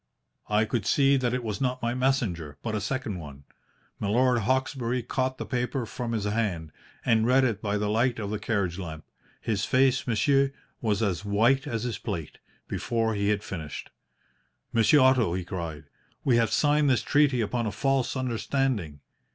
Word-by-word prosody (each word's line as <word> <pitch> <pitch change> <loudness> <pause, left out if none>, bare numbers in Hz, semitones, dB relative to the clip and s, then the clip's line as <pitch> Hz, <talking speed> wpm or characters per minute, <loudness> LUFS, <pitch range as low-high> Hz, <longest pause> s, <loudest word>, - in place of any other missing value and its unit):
"I 105 +1 +3
could 110 -3 -2
see 140 -1 +4
that 125 -2 0
it 125 0 -2
was 105 -4 -4
not 125 -1 -1
my 120 +1 0
messenger, 110 - -1
but 110 - -2
a 105 - -1
second 110 -3 -3
one. 70 -3 -10 0.6
Milord 120 +4 +2
Hawkesbury 130 +1 0
caught 130 +2 -1
the - - -5
paper 125 0 -2
from 115 +2 -4
his 110 -3 -1
hand, 100 -7 -1 0.3
and 115 -1 +3
read 130 +2 +5
it 110 -5 0
by 105 0 -1
the 105 0 -1
light 115 +4 +1
of 105 -2 -4
the 105 - -2
carriage 100 -5 -1
lamp. 80 -4 -7 0.3
His 105 -3 -1
face, 130 +2 +2
monsieur, 135 +4 +2 0.3
was 110 -3 +1
as 95 -3 -1
white 115 +8 +2
as 115 -4 -2
this 120 -3 -3
plate, 80 -3 -5 0.3
before 115 -2 -1
he 100 -1 0
had 105 0 0
finished. 80 -7 -6 0.8
"'Monsieur 115 +6 +5
Otto,' 130 -9 +4
he 95 - -2
cried, 85 -4 -5 0.4
'we 125 -3 +3
have 115 -2 +2
signed 150 -1 +3
this 130 - +2
treaty 145 -4 +3
upon 115 +1 -1
a - - -2
false 135 +5 0
understanding. 120 - -1
115 Hz, 175 wpm, -27 LUFS, 100-130 Hz, 0.8 s, read